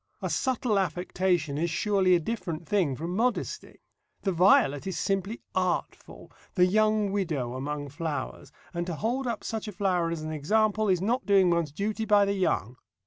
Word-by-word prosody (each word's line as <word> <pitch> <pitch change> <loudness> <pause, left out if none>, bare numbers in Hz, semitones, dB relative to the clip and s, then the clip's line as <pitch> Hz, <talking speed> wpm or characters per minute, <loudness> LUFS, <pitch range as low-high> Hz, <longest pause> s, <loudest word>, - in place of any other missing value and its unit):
A - - -3
subtle 245 -5 +1
affectation 180 -5 0
is 170 +2 0
surely 185 +1 +2
a - - +3
different 170 -4 -4
thing 180 -10 +1
from 170 +6 -4
modesty. 240 +4 -2 0.4
The 195 - +1
violet 170 -4 +4
is 190 - -3
simply 195 +3 -2
artful, 185 -1 -3 0.2
the 180 -2 +5
young 215 +1 +2
widow 155 -12 -2
among 145 +2 -4
flowers, 150 -1 -5 0.2
and 175 0 -3
to 175 - -3
hold 245 - -1
up 235 -2 -3
such 220 -1 -4
a - - -4
flower 180 -3 0
as 165 -2 -4
an 155 - -4
example 215 +7 +1
is 180 -2 +2
not 240 +6 0
doing 195 -3 +5
one's 170 -3 0
duty 210 +7 -2
by 205 -1 +5
the 200 - 0
young. 130 - -1
185 Hz, 175 wpm, -27 LUFS, 165-210 Hz, 0.4 s, the